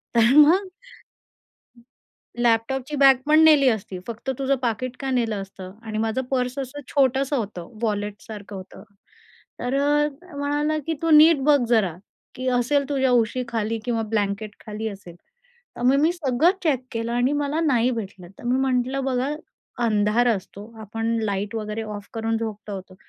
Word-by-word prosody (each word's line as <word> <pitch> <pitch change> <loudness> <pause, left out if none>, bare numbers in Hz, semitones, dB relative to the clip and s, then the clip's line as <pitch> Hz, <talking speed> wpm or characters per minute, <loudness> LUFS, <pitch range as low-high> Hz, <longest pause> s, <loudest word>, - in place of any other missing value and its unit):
तर 230 +2 +5
मग 345 +7 +6 1.7
लॅपटॉपची 245 +5 0
बॅगपण 275 +3 +5
नेली 295 -4 +6
असती, 195 -4 -4
फक्त 235 +3 -5
तुझं 275 0 +1
पाकीट 245 +2 -2
का 270 -1 -2
नेलं 235 -4 0
असतं?" 190 -1 -10
आणि 215 -1 -5
माझं 225 +3 -1
पर्स 250 0 -1
असं 270 +2 -6
छोटंसं 275 0 +2
होतं, 205 -7 -5
वॉलेटसारखं 205 -1 -4
होतं. 185 0 -11 0.8
तर 245 +2 -2
अ, 295 +1 +2
तो 300 +1 -13
म्हणाला, 295 +2 0
की 325 - 0
"तू 330 - +1
नीट 310 -1 +7
बघ 295 0 +5
जरा, 200 -8 +2 0.4
की 255 0 -3
असेल 280 +3 +1
तुझ्या 265 -2 +2
उशीखाली 230 -2 0
किंवा 230 -2 -1
ब्लँकेटखाली 210 +1 -3
असेल." 195 -4 -10 0.6
तर - - -6
मग 260 +3 +4
मी 320 +3 +3
सगळं 310 -1 +2
चेक 270 -6 +1
केलं 230 0 -3
आणि 245 +3 +1
मला 290 +2 -1
नाही 255 -6 +2
भेटलं. 195 -6 -6
तर - - -12
मी 250 +2 +1
म्हटलं, 255 +2 0
"बघा 265 +2 -1 0.5
अंधार 215 +2 +2
असतो, 200 -3 -3 0.2
आपण 225 +1 -5 0.2
लाईट 205 0 -2
वगैरे 215 0 -4
ऑफ 205 -1 -8
करून 225 0 -1
झोपलो 215 -2 -5
होतो 190 -1 -9
245 Hz, 155 wpm, -23 LUFS, 215-275 Hz, 1.7 s, नीट